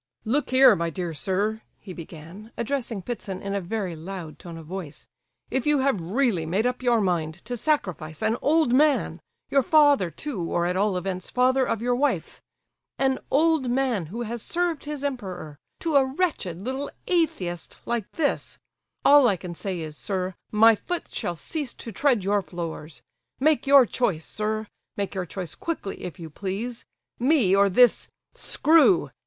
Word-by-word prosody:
"Look 275 Hz, +7 st, 0 dB
here, 260 Hz, -3 st, +7 dB
my 170 Hz, -1 st, -1 dB
dear 170 Hz, 0 st, -4 dB
sir," 200 Hz, +7 st, -1 dB, 0.2 s
he 190 Hz, -, -10 dB
began, 170 Hz, +6 st, -10 dB
addressing 235 Hz, -5 st, -3 dB
Ptitsin 200 Hz, -5 st, -5 dB
in 200 Hz, 0 st, -4 dB
a 200 Hz, -, -1 dB
very 185 Hz, -1 st, -3 dB
loud 165 Hz, -2 st, -8 dB
tone 170 Hz, -2 st, -9 dB
of 165 Hz, -, -10 dB
voice; 175 Hz, -3 st, -7 dB, 0.5 s
"if 265 Hz, +2 st, -1 dB
you 295 Hz, -1 st, +4 dB
have 265 Hz, -9 st, +1 dB
really 200 Hz, 0 st, +1 dB
made 185 Hz, +8 st, 0 dB
up 250 Hz, 0 st, -1 dB
your 240 Hz, -2 st, +3 dB
mind 165 Hz, -5 st, 0 dB
to 245 Hz, -, -3 dB
sacrifice 185 Hz, -, -2 dB
an 220 Hz, +1 st, +2 dB
old 310 Hz, -4 st, +3 dB
man—your 280 Hz, 0 st, +1 dB
father 290 Hz, -, +4 dB
too 245 Hz, -, -5 dB
or 170 Hz, +1 st, 0 dB
at 180 Hz, +1 st, 0 dB
all 195 Hz, 0 st, +1 dB
events 185 Hz, 0 st, -4 dB
father 255 Hz, +1 st, +2 dB
of 225 Hz, -, -1 dB
your 245 Hz, 0 st, +2 dB
wife—an 270 Hz, -1 st, -3 dB
old 310 Hz, -3 st, +3 dB
man 245 Hz, -, 0 dB
who 230 Hz, +8 st, -5 dB
has 235 Hz, 0 st, -4 dB
served 340 Hz, 0 st, -1 dB
his 295 Hz, -1 st, -5 dB
emperor—to 205 Hz, -, -5 dB
a 275 Hz, -, +7 dB
wretched 265 Hz, -, -1 dB
little 260 Hz, +8 st, -4 dB, 0.2 s
atheist 190 Hz, -, -1 dB
like 235 Hz, -4 st, -2 dB
this, 300 Hz, -3 st, -1 dB, 0.5 s
all 285 Hz, -2 st, +7 dB
I 200 Hz, -5 st, +2 dB
can 175 Hz, 0 st, -7 dB
say 180 Hz, 0 st, -4 dB
is, 155 Hz, -1 st, -6 dB
sir, 185 Hz, +2 st, -3 dB, 0.2 s
my 225 Hz, +2 st, +7 dB
foot 350 Hz, -, -5 dB
shall 175 Hz, -, -2 dB
cease 285 Hz, -, -5 dB
to 230 Hz, -, -7 dB
tread 245 Hz, -1 st, +2 dB
your 200 Hz, +1 st, +2 dB
floors. 165 Hz, -4 st, -7 dB, 0.4 s
Make 300 Hz, +1 st, +2 dB
your 275 Hz, -2 st, +8 dB
choice, 200 Hz, -9 st, -1 dB
sir; 215 Hz, +1 st, -2 dB, 0.3 s
make 200 Hz, -1 st, -2 dB
your 185 Hz, -2 st, -3 dB
choice 180 Hz, -4 st, -5 dB
quickly, 320 Hz, -12 st, -5 dB
if 175 Hz, -3 st, -7 dB
you 165 Hz, -2 st, -8 dB
please! 205 Hz, +8 st, -5 dB, 0.3 s
Me 245 Hz, -7 st, +4 dB
or 200 Hz, 0 st, +5 dB
this—screw! 300 Hz, -, +3 dB
215 Hz, 165 wpm, -25 LUFS, 180-270 Hz, 0.5 s, your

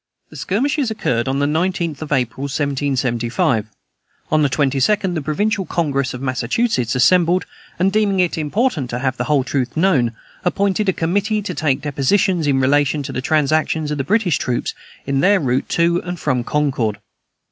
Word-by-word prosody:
The -, -, -13 dB
skirmishes 260 Hz, +6 st, 0 dB
occurred 125 Hz, -, -1 dB
on 135 Hz, +1 st, 0 dB
the 140 Hz, -, +1 dB
19th 165 Hz, 0 st, -1 dB
of 155 Hz, -, -6 dB
April, 130 Hz, -1 st, -1 dB
1775. 130 Hz, -5 st, 0 dB, 0.6 s
On 155 Hz, -, +3 dB
the 145 Hz, -, +3 dB
22d, 140 Hz, +8 st, +1 dB
the 160 Hz, -, -2 dB
Provincial 195 Hz, +8 st, 0 dB
Congress 140 Hz, -7 st, -1 dB
of 125 Hz, -, -7 dB
Massachusetts 130 Hz, -, 0 dB
assembled, 175 Hz, +6 st, +3 dB, 0.3 s
and, 190 Hz, +2 st, +2 dB
deeming 205 Hz, -2 st, +1 dB
it 180 Hz, -2 st, +2 dB
important 160 Hz, -, -1 dB
to 120 Hz, -, -3 dB
have 130 Hz, 0 st, -1 dB
the 125 Hz, -, -2 dB
whole 145 Hz, -2 st, +2 dB
truth 130 Hz, 0 st, -2 dB
known, 145 Hz, -10 st, +2 dB, 0.3 s
appointed 195 Hz, +2 st, +1 dB
a -, -, +2 dB
committee 205 Hz, +6 st, 0 dB
to -, -, -4 dB
take 140 Hz, -3 st, 0 dB
depositions 155 Hz, +4 st, +1 dB
in 135 Hz, -2 st, +2 dB
relation 145 Hz, +2 st, +2 dB
to 135 Hz, -, -5 dB
the 130 Hz, -, -3 dB
transactions 155 Hz, +1 st, +1 dB
of 150 Hz, -, -2 dB
the -, -, 0 dB
British 190 Hz, -, +1 dB
troops 125 Hz, -1 st, -2 dB, 0.3 s
in 135 Hz, 0 st, 0 dB
their 200 Hz, +6 st, +4 dB
route 130 Hz, -2 st, -1 dB
to 170 Hz, +1 st, +2 dB
and 175 Hz, -1 st, -5 dB
from 130 Hz, -5 st, 0 dB
Concord. 130 Hz, -7 st, 0 dB
150 Hz, 170 wpm, -19 LUFS, 130-185 Hz, 0.6 s, their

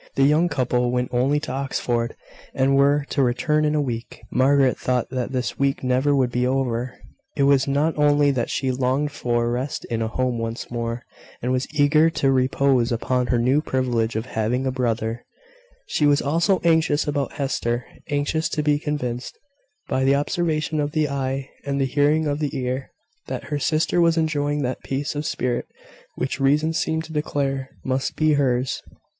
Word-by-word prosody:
The 135 Hz, -, +3 dB
young 155 Hz, +5 st, +4 dB
couple 125 Hz, -4 st, 0 dB
went 125 Hz, 0 st, -1 dB
only 135 Hz, +4 st, +2 dB
to 155 Hz, -, -5 dB
Oxford, 120 Hz, -3 st, -2 dB, 0.4 s
and 135 Hz, +1 st, +3 dB
were 140 Hz, +1 st, +3 dB
to 140 Hz, -, +1 dB
return 135 Hz, +5 st, +1 dB
in 150 Hz, 0 st, +1 dB
a 150 Hz, -, +2 dB
week. 120 Hz, -4 st, -5 dB
Margaret 135 Hz, 0 st, +3 dB
thought 125 Hz, -1 st, -1 dB
that 130 Hz, -1 st, -2 dB
this 125 Hz, -2 st, -3 dB
week 140 Hz, 0 st, 0 dB
never 130 Hz, +3 st, +2 dB
would 130 Hz, -3 st, +2 dB
be 125 Hz, +1 st, +1 dB
over. 125 Hz, -2 st, -1 dB, 0.4 s
It 140 Hz, -, +1 dB
was 140 Hz, -1 st, +4 dB
not 145 Hz, +4 st, +1 dB
only 145 Hz, -1 st, +4 dB
that 125 Hz, -3 st, -1 dB
she 130 Hz, -1 st, 0 dB
longed 130 Hz, +3 st, 0 dB
for 120 Hz, -4 st, 0 dB
rest 125 Hz, +3 st, -3 dB
in 115 Hz, -1 st, -1 dB
a 110 Hz, -, 0 dB
home 125 Hz, +1 st, -1 dB
once 115 Hz, +1 st, -5 dB
more, 115 Hz, 0 st, -3 dB, 0.4 s
and 125 Hz, -, -2 dB
was 130 Hz, +1 st, 0 dB
eager 155 Hz, +2 st, +4 dB
to 135 Hz, -4 st, +1 dB
repose 130 Hz, -1 st, +2 dB
upon 125 Hz, +2 st, 0 dB
her 125 Hz, -, +2 dB
new 130 Hz, +5 st, +3 dB
privilege 120 Hz, -6 st, -1 dB
of 110 Hz, +1 st, -2 dB
having 120 Hz, +2 st, -1 dB
a 130 Hz, -, +1 dB
brother: 115 Hz, -2 st, -2 dB, 0.6 s
she 150 Hz, -, +1 dB
was 145 Hz, 0 st, +4 dB
also 170 Hz, +6 st, +2 dB
anxious 160 Hz, -3 st, +2 dB
about 145 Hz, -1 st, -1 dB
Hester, 125 Hz, -4 st, -2 dB, 0.2 s
anxious 145 Hz, +2 st, 0 dB
to 150 Hz, -, -1 dB
be 150 Hz, -1 st, +2 dB
convinced, 125 Hz, -5 st, -4 dB, 0.5 s
by 130 Hz, -, 0 dB
the 135 Hz, +1 st, +4 dB
observation 155 Hz, 0 st, -1 dB
of 145 Hz, 0 st, -1 dB
the 155 Hz, -2 st, +1 dB
eye 135 Hz, -1 st, -2 dB, 0.2 s
and 140 Hz, -1 st, -2 dB
the 135 Hz, -, +2 dB
hearing 145 Hz, +4 st, +2 dB
of 145 Hz, 0 st, -1 dB
the 150 Hz, -3 st, -2 dB
ear, 130 Hz, +1 st, -3 dB, 0.4 s
that -, -, -4 dB
her 145 Hz, -, 0 dB
sister 155 Hz, +5 st, +1 dB
was 165 Hz, -1 st, +3 dB
enjoying 145 Hz, -2 st, 0 dB
that 125 Hz, 0 st, -3 dB
peace 140 Hz, +2 st, -3 dB
of 150 Hz, +1 st, -3 dB
spirit 125 Hz, -1 st, -2 dB, 0.5 s
which 135 Hz, -, -3 dB
reason 150 Hz, +4 st, +2 dB
seemed 160 Hz, 0 st, -1 dB
to 160 Hz, -, -10 dB
declare 135 Hz, -3 st, -1 dB
must 130 Hz, 0 st, -1 dB
be 155 Hz, -1 st, +3 dB
hers. 130 Hz, -3 st, +1 dB
135 Hz, 185 wpm, -23 LUFS, 125-145 Hz, 0.6 s, young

